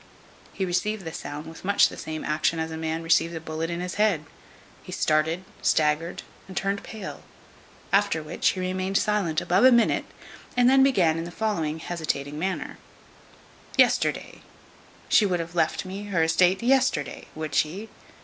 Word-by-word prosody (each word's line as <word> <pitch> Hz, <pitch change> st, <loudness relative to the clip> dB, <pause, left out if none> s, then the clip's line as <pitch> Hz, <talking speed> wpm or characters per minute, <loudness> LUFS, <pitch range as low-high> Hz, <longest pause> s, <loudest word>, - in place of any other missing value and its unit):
He 190 Hz, -, -2 dB
received 195 Hz, +2 st, -1 dB
the 160 Hz, -, -5 dB
sound 150 Hz, +1 st, -6 dB
with 160 Hz, 0 st, -11 dB
much 200 Hz, +2 st, +4 dB
the -, -, -9 dB
same 155 Hz, 0 st, -6 dB
action 155 Hz, +2 st, +1 dB
as 160 Hz, 0 st, -3 dB
a -, -, -4 dB
man 160 Hz, 0 st, -3 dB
receives 165 Hz, 0 st, +2 dB
a -, -, -3 dB
bullet 160 Hz, +1 st, -4 dB
in 170 Hz, 0 st, -3 dB
his 180 Hz, 0 st, -4 dB
head. 185 Hz, -8 st, +2 dB, 0.6 s
He -, -, -11 dB
started, 160 Hz, +3 st, +1 dB, 0.2 s
staggered, 155 Hz, +3 st, +1 dB, 0.2 s
and 190 Hz, -2 st, -9 dB
turned 195 Hz, +1 st, -1 dB
pale. 215 Hz, -4 st, -8 dB, 0.7 s
After 200 Hz, -5 st, +2 dB
which 155 Hz, +2 st, 0 dB
he 185 Hz, -, -3 dB
remained 185 Hz, +1 st, -1 dB
silent 200 Hz, -7 st, +1 dB
above 185 Hz, +5 st, +2 dB
a 260 Hz, -, +8 dB
minute, 235 Hz, -1 st, +3 dB, 0.5 s
and 245 Hz, 0 st, +5 dB
then 265 Hz, +1 st, +6 dB
began 180 Hz, -12 st, +3 dB
in 165 Hz, -, -4 dB
the -, -, -6 dB
following 170 Hz, -6 st, -2 dB
hesitating 155 Hz, -3 st, -3 dB
manner: 185 Hz, +2 st, -3 dB, 1.0 s
"Yesterday! -, -, +2 dB, 0.7 s
she 210 Hz, -, +5 dB
would 180 Hz, -2 st, 0 dB
have 165 Hz, +1 st, -5 dB
left 175 Hz, -, 0 dB
me 195 Hz, +2 st, -6 dB
her 180 Hz, -5 st, +1 dB
esteate 180 Hz, +5 st, +3 dB
yesterday! 255 Hz, -, +1 dB
would 155 Hz, -2 st, -5 dB
she? 180 Hz, +10 st, 0 dB
175 Hz, 170 wpm, -25 LUFS, 160-200 Hz, 1.0 s, a